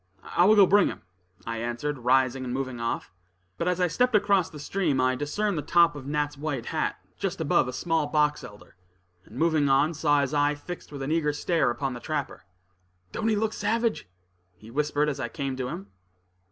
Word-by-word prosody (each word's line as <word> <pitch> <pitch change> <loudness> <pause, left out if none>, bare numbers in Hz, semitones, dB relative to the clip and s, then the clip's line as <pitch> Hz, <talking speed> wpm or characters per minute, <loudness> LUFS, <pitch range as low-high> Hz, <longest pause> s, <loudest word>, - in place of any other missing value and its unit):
"I 175 - +5
will 215 +3 +6
go 200 -2 +8
bring 200 +1 +4
him," - - -6 0.4
I 115 0 -3
answered, 120 +5 -3
rising 130 +1 +2
and 125 - -4
moving 130 -1 -3
off. 115 0 -3 0.5
But 170 - -1
as 180 0 +1
I 180 - +3
stepped 250 +7 +1
across 200 -3 +3
the 150 - -11
stream, 150 -2 -1
I 130 0 +3
discerned 160 +7 -1
the - - -2
top 170 +2 +4
of 135 -2 -8
Nat's 145 -1 -2
white 145 -5 -3
hat, - - -1 0.2
just - - -2
above - - +2
a - - -3
small 160 +3 0
box 150 0 +1
elder; 105 0 -13 0.5
and 115 - -13
moving 155 -2 +2
on, 140 +4 +3
saw 145 -2 +2
his 140 +1 -2
eye 145 0 +2
fixed 175 +4 -9
with 140 -2 -6
an 135 - -3
eager 155 -2 +1
stare 165 +1 +1
upon 135 +2 -2
the 120 - -7
trapper. 150 - -4 0.7
"Don't 220 - -2
he 220 - +3
look 220 +1 0
savage?" 225 - -1 0.5
he 110 +5 -14
whispered, 150 +2 0
as 145 -2 -2
I 120 -3 -3
came 135 0 -3
to 130 -1 -2
him. 100 -5 -7
145 Hz, 205 wpm, -26 LUFS, 130-170 Hz, 0.7 s, go